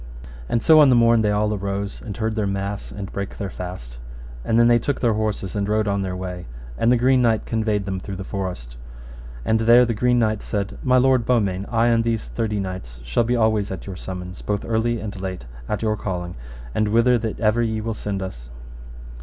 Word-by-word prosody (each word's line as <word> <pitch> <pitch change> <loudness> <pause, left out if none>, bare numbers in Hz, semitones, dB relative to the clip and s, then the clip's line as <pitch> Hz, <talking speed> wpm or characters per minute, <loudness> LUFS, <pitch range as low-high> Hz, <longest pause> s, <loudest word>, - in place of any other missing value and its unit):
And 115 - 0
so 160 -1 +7
on 145 -3 +7
the 125 - +5
morn 115 -1 +5
they 105 - +2
all 105 +1 +1
arose, 100 0 -3
and 105 - -7
heard 110 0 -1
their 105 -2 -1
mass 100 +1 -3
and 100 -2 -7
brake 100 0 -5
their 100 -3 -4
fast; - - -7 0.4
and 110 - +1
then 120 - +6
they 120 0 +5
took 140 +4 -2
their 115 -3 +2
horses 105 -3 -2
and 100 0 -1
rode 105 0 +1
on 100 0 0
their 95 -1 -3
way, 90 -3 -6 0.3
and 115 - +2
the 125 - +5
Green 130 +2 +3
Knight 115 -3 +2
conveyed 110 -3 0
them 95 -1 -3
through 95 +1 -6
the 95 - -5
forest; 90 - -5 0.7
and 110 - +2
there 120 +2 +6
the 115 - -1
Green 125 +3 +2
Knight 110 -3 +1
said, 100 -1 -3
My 130 -1 +3
lord 130 -1 +4
Beaumains, 100 -6 0
I 115 0 +2
and 115 -1 +3
these 115 -1 -2
thirty 110 -3 -2
knights 90 -11 -6
shall - - +1
be 120 +2 +1
always 110 -3 +2
at 95 -3 -6
your 95 - -6
summons, 90 0 -7
both 105 -1 -2
early 115 +1 0
and 100 -3 -6
late, 95 -9 -5 0.2
at 105 - -2
your 110 -1 +1
calling 90 -4 -4 0.4
and 110 - +1
whither 115 +3 +4
that 110 -1 -4
ever 110 +1 +2
ye 110 -1 -1
will 115 +1 -3
send 100 -2 -4
us. - - -8
105 Hz, 220 wpm, -22 LUFS, 95-115 Hz, 0.7 s, so